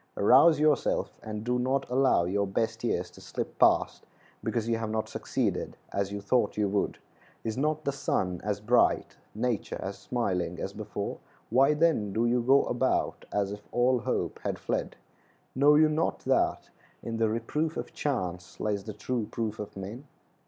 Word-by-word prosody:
Rouse 140 Hz, +10 st, +6 dB
yourself, 150 Hz, -2 st, +2 dB
and 105 Hz, -1 st, -5 dB
do 125 Hz, +1 st, 0 dB
not 130 Hz, +2 st, 0 dB
allow 130 Hz, -7 st, +3 dB
your 100 Hz, +3 st, 0 dB
best 110 Hz, +4 st, -1 dB
years -, -, -1 dB
to -, -, -15 dB
slip -, -, -5 dB
past -, -, +3 dB, 0.4 s
because 115 Hz, -2 st, -1 dB
you 115 Hz, -1 st, +1 dB
have 110 Hz, -1 st, -3 dB
not 110 Hz, 0 st, -1 dB
succeeded -, -, -2 dB, 0.2 s
as 100 Hz, 0 st, -1 dB
you 100 Hz, 0 st, -4 dB
thought 105 Hz, +1 st, +1 dB
you 105 Hz, -1 st, +2 dB
would. 100 Hz, 0 st, 0 dB, 0.5 s
Is 110 Hz, -1 st, -2 dB
not 155 Hz, +3 st, 0 dB
the 140 Hz, -, +1 dB
sun 90 Hz, -9 st, -1 dB
as 105 Hz, 0 st, -2 dB
bright, 120 Hz, +4 st, +2 dB, 0.2 s
nature 115 Hz, -1 st, -1 dB
as 95 Hz, 0 st, -5 dB
smiling 95 Hz, -8 st, -2 dB
as -, -, -4 dB
before? -, -, -5 dB, 0.3 s
Why, 135 Hz, +5 st, +5 dB
then, 150 Hz, -11 st, +2 dB
do 115 Hz, +3 st, +1 dB
you 120 Hz, +1 st, +2 dB
go 135 Hz, +4 st, +5 dB
about 130 Hz, +2 st, 0 dB
as 100 Hz, -1 st, 0 dB
if 105 Hz, 0 st, -6 dB
all 125 Hz, +1 st, +3 dB
hope -, -, -2 dB
had -, -, -3 dB
fled? -, -, -2 dB, 0.6 s
Know 145 Hz, +3 st, +5 dB
you 155 Hz, +1 st, +6 dB
not 155 Hz, +2 st, 0 dB
that -, -, +1 dB, 0.3 s
"In 115 Hz, -1 st, -3 dB
the 115 Hz, -1 st, +2 dB
reproof 150 Hz, +8 st, -1 dB
of -, -, -5 dB
chance 90 Hz, -11 st, -3 dB
Lies 100 Hz, -2 st, -1 dB
the 110 Hz, -, -5 dB
true 110 Hz, +1 st, -3 dB
proof 110 Hz, -2 st, -3 dB
of 105 Hz, -1 st, -7 dB
men." 110 Hz, +9 st, -7 dB
115 Hz, 175 wpm, -29 LUFS, 100-130 Hz, 0.6 s, Rouse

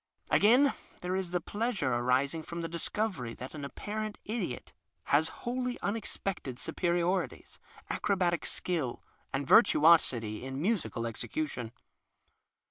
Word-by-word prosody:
Again, 255 Hz, +7 st, +6 dB, 0.3 s
there 180 Hz, +1 st, -1 dB
is 190 Hz, -2 st, -2 dB
the 180 Hz, 0 st, 0 dB
pleasure 205 Hz, -, -1 dB
arising 130 Hz, +6 st, +1 dB
from 170 Hz, +1 st, -6 dB
the 165 Hz, -, -2 dB
discovery 170 Hz, -, -1 dB
that 130 Hz, -, -8 dB
an 150 Hz, -2 st, -6 dB
apparent 215 Hz, +8 st, -4 dB
idiot 205 Hz, -, -4 dB, 0.3 s
has 155 Hz, +3 st, +3 dB, 0.2 s
wholly 250 Hz, 0 st, -2 dB
unexpected 195 Hz, -, -2 dB
superiorities, 175 Hz, +5 st, -1 dB, 0.3 s
acrobatic 180 Hz, -4 st, +1 dB
skill, 155 Hz, -9 st, -2 dB, 0.3 s
and 135 Hz, +1 st, -1 dB
vir -, -, +9 dB
tuosity 130 Hz, -9 st, +3 dB
in 135 Hz, +1 st, -5 dB
musical 170 Hz, -, 0 dB
execution. 120 Hz, +1 st, -3 dB
170 Hz, 120 wpm, -31 LUFS, 130-200 Hz, 0.3 s, vir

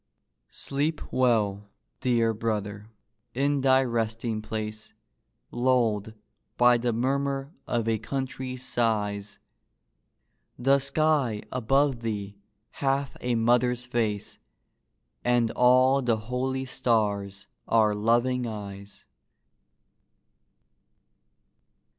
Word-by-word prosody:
Sleep 150 Hz, +3 st, -2 dB
well, 105 Hz, -5 st, +1 dB, 0.3 s
dear 115 Hz, -3 st, +2 dB
brother, 105 Hz, -1 st, -3 dB, 0.5 s
in 140 Hz, +1 st, +1 dB
thy 130 Hz, 0 st, +4 dB
resting 115 Hz, -2 st, -2 dB
place, 110 Hz, 0 st, -5 dB, 0.6 s
Lulled 115 Hz, -4 st, +1 dB, 0.4 s
by 120 Hz, 0 st, +5 dB
the 120 Hz, 0 st, 0 dB
murmur 135 Hz, +4 st, -1 dB
of 115 Hz, -2 st, -1 dB
a 110 Hz, -1 st, +1 dB
country's 130 Hz, +1 st, -4 dB
sighs. 105 Hz, -4 st, -1 dB, 1.2 s
The 135 Hz, +3 st, +3 dB
sky 140 Hz, -5 st, +1 dB
above 135 Hz, +1 st, +1 dB
thee 105 Hz, -3 st, -4 dB, 0.4 s
hath 135 Hz, 0 st, -1 dB
a 125 Hz, -1 st, 0 dB
mother's 120 Hz, +1 st, +2 dB
face, 115 Hz, -4 st, -2 dB, 0.8 s
And 120 Hz, -2 st, +2 dB
all 130 Hz, +2 st, +4 dB
the 120 Hz, -3 st, +1 dB
holy 130 Hz, +4 st, -3 dB
stars 100 Hz, -6 st, -1 dB, 0.2 s
are 110 Hz, -2 st, +3 dB
loving 120 Hz, +4 st, +1 dB
eyes. 100 Hz, -2 st, -8 dB
120 Hz, 85 wpm, -27 LUFS, 110-130 Hz, 1.2 s, by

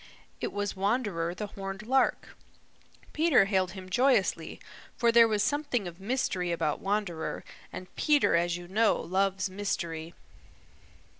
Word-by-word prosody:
It -, -, -3 dB
was 205 Hz, 0 st, -3 dB
Wanderer 195 Hz, -5 st, -1 dB
the 210 Hz, -, -4 dB
Horned 195 Hz, 0 st, -7 dB
Lark. 265 Hz, +3 st, +1 dB, 0.8 s
Peter 310 Hz, -9 st, +4 dB
hailed 190 Hz, -3 st, 0 dB
him 190 Hz, -2 st, -9 dB
joyously, 245 Hz, +1 st, +1 dB, 0.4 s
for 235 Hz, -1 st, +3 dB
there 230 Hz, 0 st, +7 dB
was 210 Hz, -2 st, +1 dB
something 285 Hz, -9 st, -1 dB
of 170 Hz, +1 st, -9 dB
mystery 195 Hz, -6 st, -1 dB
about 165 Hz, -3 st, -1 dB
Wanderer, 195 Hz, -5 st, -2 dB, 0.3 s
and 185 Hz, -, -9 dB
Peter, 295 Hz, -, +3 dB
as 170 Hz, 0 st, +1 dB
you 175 Hz, 0 st, -10 dB
know, 215 Hz, +4 st, +2 dB
loves 190 Hz, +2 st, 0 dB
mystery. 170 Hz, -4 st, -4 dB
195 Hz, 135 wpm, -29 LUFS, 175-230 Hz, 0.8 s, there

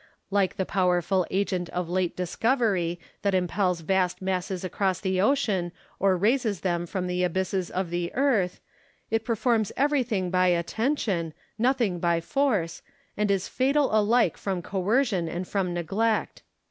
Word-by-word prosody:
Like 195 Hz, -2 st, +1 dB
the 190 Hz, -, 0 dB
powerful 180 Hz, 0 st, +1 dB
agent 185 Hz, -2 st, -1 dB
of 180 Hz, -1 st, -3 dB
late 180 Hz, 0 st, -1 dB
discovery, 185 Hz, -2 st, 0 dB, 0.2 s
that 200 Hz, -2 st, +1 dB
impels 180 Hz, -1 st, 0 dB
vast 185 Hz, +1 st, +1 dB
masses 185 Hz, -1 st, -2 dB
across 185 Hz, 0 st, -1 dB
the 190 Hz, -1 st, 0 dB
ocean 205 Hz, -8 st, +1 dB, 0.3 s
or 190 Hz, -1 st, +3 dB
raises 220 Hz, 0 st, +1 dB
them 175 Hz, -2 st, -1 dB
from 185 Hz, +1 st, -3 dB
the 180 Hz, 0 st, -1 dB
abysses 185 Hz, +1 st, -1 dB
of 185 Hz, -2 st, -3 dB
the 175 Hz, 0 st, -2 dB
earth, 240 Hz, -10 st, +1 dB, 0.5 s
it 225 Hz, 0 st, +1 dB
performs 225 Hz, -1 st, +1 dB
everything 250 Hz, -10 st, +1 dB
by 185 Hz, 0 st, +3 dB
attention, 180 Hz, -, 0 dB, 0.2 s
nothing 235 Hz, -7 st, +1 dB
by 170 Hz, -1 st, +2 dB
force, 200 Hz, -, 0 dB, 0.3 s
and 210 Hz, 0 st, 0 dB
is 195 Hz, -1 st, +1 dB
fatal 275 Hz, -2 st, +1 dB
alike 215 Hz, -3 st, +3 dB
from 190 Hz, -3 st, -3 dB
coercion 195 Hz, -1 st, 0 dB
and 175 Hz, +2 st, -4 dB
from 190 Hz, -3 st, -1 dB
neglect. 195 Hz, +6 st, -1 dB
190 Hz, 145 wpm, -26 LUFS, 180-220 Hz, 0.5 s, or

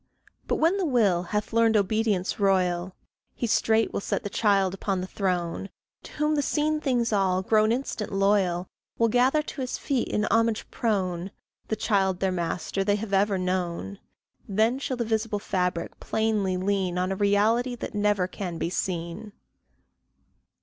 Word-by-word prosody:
But -, -, +1 dB
when 335 Hz, +5 st, +2 dB
the 385 Hz, -, 0 dB
Will 210 Hz, -, +3 dB
hath 210 Hz, +5 st, -3 dB
learned 225 Hz, -1 st, +4 dB
obedience 210 Hz, -1 st, 0 dB
royal, 185 Hz, -2 st, +1 dB, 0.4 s
He -, -, -2 dB
straight 225 Hz, 0 st, +2 dB
will -, -, -1 dB
set -, -, -2 dB
the 205 Hz, -, -5 dB
child 195 Hz, -4 st, +2 dB
upon 195 Hz, 0 st, -2 dB
the 180 Hz, -, -3 dB
throne; 185 Hz, -1 st, -2 dB, 0.3 s
To -, -, -12 dB
whom 300 Hz, +1 st, +1 dB
the 295 Hz, -, +2 dB
seen 305 Hz, +2 st, 0 dB
things 240 Hz, -5 st, +1 dB
all, 190 Hz, -2 st, +2 dB
grown 215 Hz, +2 st, +3 dB
instant 235 Hz, -3 st, -3 dB
loyal, 195 Hz, -3 st, +2 dB, 0.3 s
Will 230 Hz, 0 st, +3 dB
gather 255 Hz, +6 st, +3 dB
to 290 Hz, -, -7 dB
his 255 Hz, -, -3 dB
feet, 265 Hz, -4 st, -1 dB
in 210 Hz, -, 0 dB
homage 225 Hz, 0 st, +2 dB
prone 190 Hz, -5 st, -1 dB, 0.4 s
The 220 Hz, -, -1 dB
child 190 Hz, -4 st, +1 dB
their 190 Hz, 0 st, +1 dB
master 180 Hz, +2 st, -2 dB
they 205 Hz, +1 st, +2 dB
have 205 Hz, -1 st, -5 dB
ever 195 Hz, 0 st, +3 dB
known; 175 Hz, -, -2 dB, 0.5 s
Then 220 Hz, +6 st, +2 dB
shall 260 Hz, -2 st, -3 dB
the 235 Hz, -, -1 dB
visible 220 Hz, -1 st, -1 dB
fabric 180 Hz, -3 st, -2 dB
plainly 215 Hz, -4 st, 0 dB
lean 190 Hz, -1 st, 0 dB
On 185 Hz, +1 st, 0 dB
a -, -, 0 dB
Reality 215 Hz, +5 st, +2 dB
that -, -, -6 dB
never 205 Hz, -3 st, +1 dB
can 180 Hz, -3 st, -5 dB
be 170 Hz, -, -2 dB
seen. 180 Hz, +4 st, -4 dB
205 Hz, 165 wpm, -26 LUFS, 185-225 Hz, 0.5 s, learned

